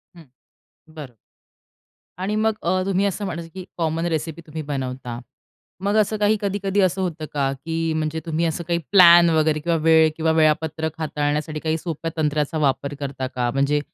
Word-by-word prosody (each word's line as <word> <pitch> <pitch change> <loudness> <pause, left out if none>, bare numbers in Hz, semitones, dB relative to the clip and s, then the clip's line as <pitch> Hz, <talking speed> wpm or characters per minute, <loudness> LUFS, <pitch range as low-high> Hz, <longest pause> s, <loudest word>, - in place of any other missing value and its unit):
हं. 165 -4 -15 0.7
बरं. 130 -5 -9 1.0
आणि 190 +3 -2
मग 220 +1 +2
अ, 185 +2 +1
तुम्ही 195 0 +1
असं 200 +1 -2
म्हणायचं, 170 -3 -5
की 185 -1 -8
कॉमन 165 0 -1
रेसिपी 160 0 -3
तुम्ही 155 +1 -5
बनवता, 130 -4 -5 0.6
मग 200 +1 +1
असं 215 0 +2
काही 210 +1 +2
कधी-कधी 200 0 0
असं 185 0 +1
होतं 165 -4 -3
का, 140 -2 0
की 160 +4 -3
म्हणजे 155 0 -2
तुम्ही 165 0 -1
असं 165 +1 -2
काही 170 -1 +1
प्लॅन 175 -3 +8
वगैरे 155 -1 +2
किंवा 165 +2 0
वेळ 160 0 +5
किंवा 160 0 +1
वेळापत्रक 160 0 +1
हाताळण्यासाठी 150 0 -2
काही 160 +1 -1
सोप्या 165 0 -5
तंत्राचा 150 0 0
वापर 140 -1 0
करता 135 -2 -4
का? 125 -2 -2
म्हणजे 140 +2 +1
160 Hz, 170 wpm, -22 LUFS, 150-175 Hz, 1.0 s, प्लॅन